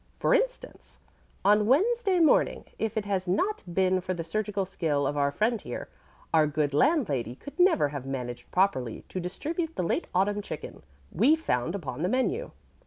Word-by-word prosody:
For - - +2
instance, - - -2 0.5
on 210 +1 +5
Wednesday 390 - +3
morning 320 -3 +3
if 220 0 -2
it 215 - -1
had 195 -2 -1
not 375 - 0
been 185 +1 +2
for 185 +1 -3
the 165 - -4
surgical 205 +3 -2
skill 160 -6 -1
of 145 - -1
our 140 -1 +2
friend 215 +8 0
here, 120 - -6 0.4
our 155 -2 +5
good 145 -1 -1
landlady 145 - +1
could 285 - -12
never 345 - +4
have 140 -2 -6
managed 125 -3 -5
properly 130 - 0
to 185 - -4
distribute 320 - -4
the - - -1
late 170 - -1
autumn 205 +3 +2
chicken - - -8 0.3
we 255 - +4
found 165 - -1
upon 145 -7 -5
the 180 - +1
menu. 260 - 0
195 Hz, 175 wpm, -28 LUFS, -, 0.5 s, on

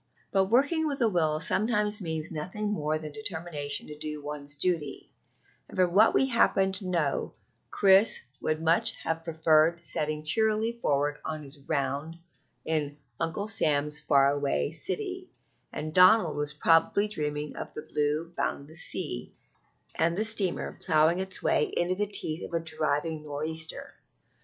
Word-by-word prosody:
But 195 -1 +3
working 285 - +2
with 280 -2 -3
a 230 - +4
will 160 -6 +1
sometimes 210 +3 0
means 160 -2 -4
nothing 185 +7 -4
more 155 -6 -1
than 155 -1 -8
determination 160 -6 -3
to 150 - -9
do 150 -1 -5
one's 145 0 -6
duty; 165 0 -2 0.6
and - - -11
from 180 -2 +2
what 215 +4 +5
we - - +4
happen 210 -6 +2
to 190 0 +1
know, 165 -6 -1 0.4
Chris 195 +2 +4 0.2
would 155 +1 -1
much 215 +8 +3
have 165 0 -2
preferred 160 0 +3
setting 155 -1 -2
cheerily 220 +7 +2
forth 145 -10 -1
on 155 -1 -5
his 140 +1 -12
round 140 +3 -2 0.5
in 150 -2 -2 0.2
Uncle 165 +6 -2
Sam's 150 -6 +2
far 140 -2 +4
away 145 0 -1
city, 370 - -1 0.4
and 155 0 -5
Donald 180 -2 +6
was 145 0 -2
probably 165 +7 +3
dreaming 150 -6 -4
of - - -7
the 150 - -6
blue 155 +2 -1
boundless 155 +3 -3
sea - - -2 0.6
and 170 +2 0
the 215 - 0
steamer 210 -5 -1
ploughing 160 +1 +3
its 190 0 -3
way 150 - +3
in 175 +1 -1
the 205 +2 -1
teeth 175 -5 -3
of - - -5
a - - +2
driving 155 -1 -2
nor'easter. 155 +2 -4
160 Hz, 150 wpm, -28 LUFS, 150-195 Hz, 0.6 s, Donald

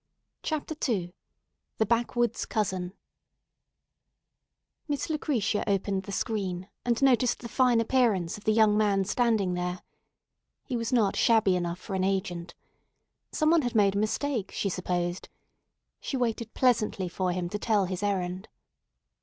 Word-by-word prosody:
CHAPTER 310 0 -3 0.2
II 180 -6 -1 0.6
THE 220 - +2
BACKWOODS 235 +1 0
COUSIN 185 -4 -2 1.9
MISS 290 +2 -2
LUCRETIA 250 -9 0
opened 195 -1 0
the 200 - -6
screen, 190 -3 -2 0.2
and 235 -1 +1
noticed 250 -2 +3
the - - -4
fine 245 0 +3
appearance 225 -8 +2
of 210 - -12
the 215 - +4
young 215 -1 +4
man 200 -2 +2
standing 215 -4 +1
there. 180 0 -3 0.8
He 255 - -4
was 230 -1 -2
not 220 -6 +2
shabby 220 -5 +4
enough 175 -1 -2
for 190 - -8
an 190 -1 0
agent. 180 -3 -2 0.8
Some 310 0 +2
one 335 -1 +5
had 245 -4 -3
made 200 -2 +4
a 200 - 0
mistake, 220 +1 -1
she 200 - -1
supposed. 180 -1 -2 0.7
She 270 - -3
waited 230 -2 -2
pleasantly 215 -7 +2
for 180 +1 -1
him 175 0 -2
to 210 - -4
tell 210 -3 +2
his 185 0 -4
errand. 190 -1 -2
210 Hz, 145 wpm, -28 LUFS, 185-235 Hz, 1.9 s, one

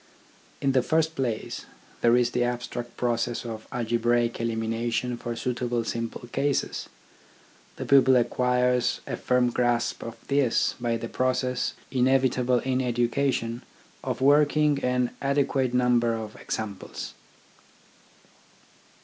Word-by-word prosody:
In 140 - +2
the 130 -1 +3
first 160 +4 +1
place, 120 -7 -3 0.3
there 120 +1 +5
is 120 -1 +2
the 125 - +1
abstract 120 0 -4
process 120 0 -1
of 110 -2 -6
algebraic 120 0 0
elimination 115 +2 -1
for 120 0 -5
suitable 120 -1 -1
simple 115 +1 -4
cases. 140 +2 -1 0.9
The - - -5
pupil 130 -1 +6
acquires 125 0 +2
a - - -3
firm 125 -1 +1
grasp 120 0 0
of 115 0 -6
this 140 -4 +2
by 115 -1 0
the 115 - -5
process, 125 +1 0 0.2
inevitable 130 -1 +2
in 130 0 0
education, 120 -1 0 0.4
of - - -3
working 145 +1 +4
an 125 -1 +1
adequate 135 -2 +1
number 120 -2 +2
of 110 -1 -6
examples. 105 -3 -5
125 Hz, 115 wpm, -26 LUFS, 120-130 Hz, 0.9 s, pupil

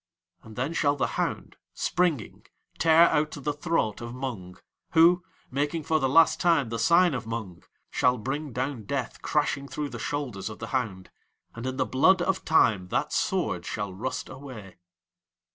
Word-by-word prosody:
And 110 -1 -13
then 130 +6 -2
shall 145 -3 +2
the 145 - 0 0.2
hound, - - -3 0.2
springing, 170 -10 -1 0.3
tear 165 0 +6
out 150 0 +1
the 145 0 -3
throat 145 - -1
of 120 +1 -6
Mung, 115 -9 -6 0.4
who, 175 +2 +6 0.3
making 145 +4 -1
for 155 +1 +1
the 135 -2 +1
last 165 +4 +5
time 165 -8 +3
the 115 0 -3
sign 170 +7 +4
of 125 -3 -4
Mung, 110 -6 -5 0.3
shall 125 0 +2
bring 140 +5 -4
down 125 -2 -3
Death - - -3
crashing 140 0 0
through 145 +1 -4
the 120 -2 -7
shoulders 115 -8 -3
of 105 - -8
the 115 - -7
hound, 105 -8 -2 0.4
and 120 +2 -6
in 130 0 -3
the - - +1
blood 185 +9 +4
of 190 0 -1
Time 110 - +3
that - - -1
Sword - - 0
shall 100 -2 -4
rust 125 +7 -4
away. 120 -10 -10
130 Hz, 170 wpm, -27 LUFS, 115-155 Hz, 0.4 s, tear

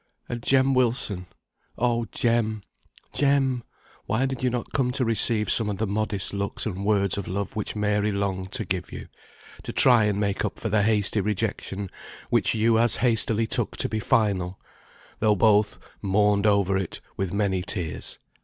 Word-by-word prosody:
And 120 -1 -5
Jem 135 +2 +3
Wilson! 115 -7 0 0.5
Oh, 120 -1 0
Jem, 110 -3 0 0.5
Jem, 135 -2 +2 0.5
why 110 +6 +1
did 130 -2 -3
you 130 - +2
not 120 -1 -4
come 130 -3 +1
to 130 -1 0
receive 110 -1 +3
some 110 -2 +3
of 100 - -3
the 110 - 0
modest 105 -1 -2
looks 100 0 -3
and 100 -3 -3
words 100 -2 +1
of 100 - -6
love 100 +1 -3
which 105 0 -3
Mary 105 0 +1
longed 95 -2 -2
to 115 -5 -3
give 90 -2 -3
you, - - -8 0.5
to - - -6
try 120 -4 +5
and 105 -1 0
make 100 -1 -1
up - - -3
for 110 - -3
the 105 0 +3
hasty 105 0 +1
rejection 100 -1 -3 0.4
which - - +2
you 110 +1 +3
as 120 -1 +3
hastily 115 -1 +1
took - - -2
to - - 0
be 110 0 -2
final, 100 -4 +1 0.6
though 105 -1 +3
both 105 0 +3 0.2
mourned 105 +1 +2
over 100 -2 +3
it 95 - -5 0.2
with 95 -2 -2
many 100 -2 0
tears. 85 -5 -4
105 Hz, 175 wpm, -25 LUFS, 100-115 Hz, 0.6 s, try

